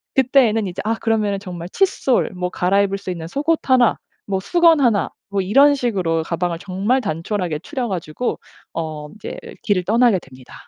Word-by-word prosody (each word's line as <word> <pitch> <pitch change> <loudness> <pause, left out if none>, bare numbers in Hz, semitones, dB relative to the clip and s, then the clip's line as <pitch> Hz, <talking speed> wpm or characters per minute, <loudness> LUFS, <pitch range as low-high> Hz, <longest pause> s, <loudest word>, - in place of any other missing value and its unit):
그때에는 245 -5 +3
이제 180 - -5
아 225 +1 +1
그러면은 215 -3 0
정말 180 -3 -7
칫솔 275 - +1
뭐 180 0 -2
갈아입을 195 +2 +1
수 190 -2 -6
있는 165 -2 -6
속옷 300 - 0
1 250 -3 +4 0.3
뭐 195 -1 -1
수건 330 - +4
1 225 -6 +2 0.2
뭐 200 -1 0
이런 275 +10 +5
식으로 185 -11 0
가방을 170 0 -2
정말 200 +8 0
단촐하게 170 -3 -2
추려 255 - -4
가지고 180 +5 -3 0.3
어 155 -2 -5
인제 215 - -8 0.3
길을 195 -4 +1
떠나게 230 -1 +4
됩니다. 130 -4 -16
200 Hz, 330 characters per minute, -20 LUFS, 175-245 Hz, 0.3 s, 이런